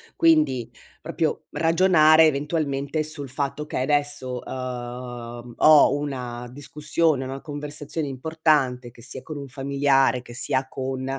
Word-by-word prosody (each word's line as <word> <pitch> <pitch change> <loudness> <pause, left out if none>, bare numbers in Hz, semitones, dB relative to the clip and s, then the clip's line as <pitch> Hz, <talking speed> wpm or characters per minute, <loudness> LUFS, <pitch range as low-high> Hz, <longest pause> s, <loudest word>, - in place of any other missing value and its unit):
quindi 305 - +3 0.3
proprio - - -2
ragionare 165 -2 +5
eventualmente 145 0 -1
sul 150 -3 -6
fatto 140 +2 -3
che 130 - -2
adesso, 145 -3 -1
uhm, 120 -1 -7
ho 155 -1 +7
una 125 -4 -5
discussione, 150 +1 -1
una 135 +1 -6
conversazione 145 +1 -5
importante, 135 -3 0
che 120 0 -17
sia 130 +1 -7
con 155 +1 -8
un 140 - -7
familiare, 135 -1 +2
che 120 - -12
sia 130 +2 0
con 130 0 -4
140 Hz, 125 wpm, -24 LUFS, 125-150 Hz, 0.3 s, ho